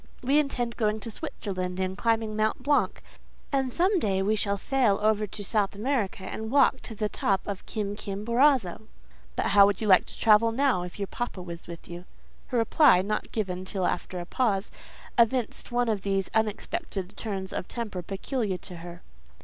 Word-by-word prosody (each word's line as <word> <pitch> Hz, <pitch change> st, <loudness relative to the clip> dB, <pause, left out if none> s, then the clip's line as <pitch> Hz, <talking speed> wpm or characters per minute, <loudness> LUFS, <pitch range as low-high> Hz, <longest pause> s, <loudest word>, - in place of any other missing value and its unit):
We 275 Hz, +4 st, +4 dB
intend 245 Hz, -5 st, -1 dB
going 215 Hz, -2 st, +1 dB
to 230 Hz, -, -4 dB
Switzerland, 185 Hz, -3 st, -4 dB
and 190 Hz, 0 st, -1 dB
climbing 225 Hz, 0 st, 0 dB
Mount 215 Hz, +3 st, 0 dB
Blanck; 290 Hz, +1 st, +1 dB, 0.5 s
and 265 Hz, -2 st, +1 dB
some 370 Hz, -, +2 dB
day 195 Hz, -7 st, +1 dB
we 215 Hz, +2 st, +2 dB
shall 200 Hz, -1 st, 0 dB
sail 240 Hz, -3 st, +2 dB
over 215 Hz, 0 st, +2 dB
to 205 Hz, +1 st, -5 dB
South 205 Hz, -1 st, +1 dB
America, 215 Hz, -4 st, -1 dB
and 220 Hz, +3 st, -5 dB
walk 265 Hz, 0 st, +4 dB
to 225 Hz, -, -7 dB
the 210 Hz, 0 st, -1 dB
top 195 Hz, -2 st, 0 dB
of 200 Hz, -2 st, -5 dB
Kim 205 Hz, -2 st, -3 dB
kim 205 Hz, 0 st, -5 dB
borazo." 235 Hz, -5 st, +2 dB, 0.5 s
"But -, -, 0 dB
how 200 Hz, 0 st, +7 dB
would 200 Hz, -2 st, 0 dB
you 220 Hz, -, -2 dB
like 190 Hz, -3 st, +5 dB
to -, -, -11 dB
travel 225 Hz, +1 st, +5 dB
now, 260 Hz, -5 st, +2 dB
if 180 Hz, 0 st, -7 dB
your 200 Hz, -, -1 dB
papa 200 Hz, -3 st, -5 dB
was 170 Hz, -1 st, -8 dB
with 170 Hz, -1 st, -9 dB
you?" 175 Hz, +1 st, -8 dB, 0.4 s
Her 250 Hz, -, -1 dB
reply—not 225 Hz, -, +3 dB
given 185 Hz, -4 st, -2 dB
till 185 Hz, -1 st, -2 dB
after 180 Hz, +1 st, -2 dB
a 175 Hz, -, -5 dB
pause—evinced 230 Hz, +3 st, -1 dB
one 245 Hz, 0 st, +1 dB
of 215 Hz, -3 st, 0 dB
those 195 Hz, -1 st, -1 dB
unexpected 220 Hz, -, -2 dB
turns 195 Hz, -4 st, -4 dB
of -, -, -4 dB
temper 215 Hz, -6 st, -4 dB
peculiar 200 Hz, +2 st, -2 dB
to 180 Hz, -1 st, -10 dB
her. 175 Hz, +1 st, -10 dB
210 Hz, 180 wpm, -27 LUFS, 190-235 Hz, 0.5 s, how